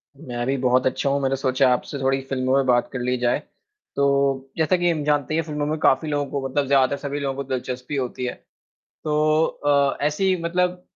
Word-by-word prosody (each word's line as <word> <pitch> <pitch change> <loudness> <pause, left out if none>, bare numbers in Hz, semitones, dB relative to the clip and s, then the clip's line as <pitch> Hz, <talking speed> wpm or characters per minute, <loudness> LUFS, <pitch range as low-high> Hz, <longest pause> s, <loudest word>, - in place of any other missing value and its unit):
मैं 120 -5 -5
भी 135 - +1
बहुत 125 0 +2
अच्छा 140 - -1
हूँ, 140 +1 0
मैंने 135 0 +1
सोचा 130 0 +2
आपसे 140 +3 -3
थोड़ी 135 0 +1
फ़िल्मों 130 0 0
पे 135 - +3
बात 120 -1 +2
कर 130 - -3
ली 125 +1 0
जाए, 120 0 +1 0.6
तो, 140 -1 +1
जैसा 160 +3 +2
कि 175 0 +1
हम 155 -3 -1
जानते 145 -1 0
ही - - +1
हैं - - 0
फ़िल्मों 150 -1 -3
में 155 +2 -1
काफ़ी 155 +2 +3
लोगों 145 -1 0
को 135 -1 -2
मतलब 140 +1 -1
ज़्यादातर 135 0 +3
सभी 145 0 -3
लोगों 135 -1 -2
को 140 - -4
दिलचस्पी 125 +1 -4
होती 125 -1 -3
है, 125 - -2 0.7
तो 155 +1 +2
अ, 140 -1 +1
ऐसी 185 +5 +1
मतलब 180 +1 0
140 Hz, 215 wpm, -23 LUFS, 130-150 Hz, 0.7 s, पे